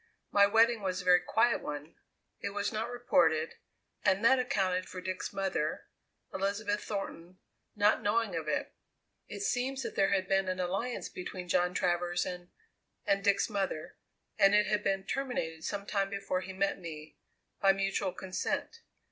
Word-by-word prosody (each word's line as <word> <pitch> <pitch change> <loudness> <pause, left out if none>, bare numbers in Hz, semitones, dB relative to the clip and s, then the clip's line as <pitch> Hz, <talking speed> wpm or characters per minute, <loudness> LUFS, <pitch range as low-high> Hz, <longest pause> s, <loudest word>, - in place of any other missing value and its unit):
My 200 0 +6
wedding 225 +2 +4
was 185 -1 -1
a 180 - -7
very 180 -1 +7
quiet 225 +7 +2
one; 150 +2 -6 0.5
it 200 0 -4
was 205 0 0
not 220 +2 -2
reported, 170 -10 +2 0.5
and 200 +2 +3
that 265 +2 +6
accounted 190 -8 0
for 185 - -6
Dick's 185 0 -4
mother 190 -6 -2 0.5
Elizabeth 205 +2 -1
Thornton 185 -3 -5 0.4
not 210 0 +3
knowing 210 -2 +1
of 160 -2 -3
it. 145 -2 -1 0.5
"It - - -7
seems 265 -6 -1
that - - -4
there 195 - +3
had 190 -1 +1
been 195 0 +2
an 185 0 -2
alliance 195 +7 -2
between 180 0 -7
John 180 +1 +1
Travers 175 0 +1
and 180 -1 -6 0.6
and 195 0 +2
Dick's 200 0 +3
mother, 195 -7 -3 0.4
and 195 +1 +6
it 210 0 +5
had 210 0 0
been 195 0 0
terminated 200 -13 -3
some 200 -1 -3
time 195 -1 0
before 195 -2 -2
he 185 +1 -7
met 195 +1 0
me, 155 -3 -9 0.4
by 195 - +6
mutual 195 -1 0
consent. 190 - -3
195 Hz, 165 wpm, -31 LUFS, 180-210 Hz, 0.6 s, very